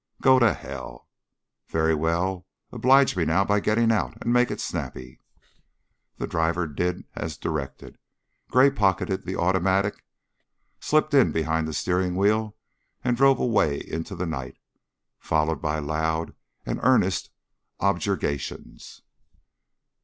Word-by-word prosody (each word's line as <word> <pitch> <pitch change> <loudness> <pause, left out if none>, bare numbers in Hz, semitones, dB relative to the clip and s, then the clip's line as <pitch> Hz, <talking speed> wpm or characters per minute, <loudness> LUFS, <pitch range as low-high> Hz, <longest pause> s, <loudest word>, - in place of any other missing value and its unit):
"Go 130 -1 +5
to 120 -6 +4
hell!" - - -9 0.6
"Very 80 0 +1
well. 85 +4 -1 0.2
Oblige 135 0 +4
me 90 - +1
now 85 +5 +2
by 105 +1 +2
getting 115 +3 +2
out.... 110 - -1
And 120 - -1
make 125 0 +3
it - - -4
snappy!" 65 0 -6 1.0
The - - -3
driver 80 +2 0
did 90 +4 -2
as 80 0 -5
directed. 70 -4 -5 0.5
Gray 130 +2 +5
pocketed 95 -2 0
the 95 - -3
automatic, 95 +3 +1 0.8
slipped 155 0 +1
in 135 -3 +5
behind 80 0 -1
the 80 - -5
steering 90 0 0
wheel, 105 +2 +1 0.5
and 125 -1 +1
drove 135 +1 +5
away 80 - +1
into 80 +1 -6
the 90 - -3
night, 65 -6 -5 0.6
followed 80 +1 0
by 75 -1 -1
loud 80 +2 -2 0.3
and - - -3
earnest - - +2 0.5
objurgations. 95 -7 -3
90 Hz, 125 wpm, -25 LUFS, 80-105 Hz, 1.0 s, Go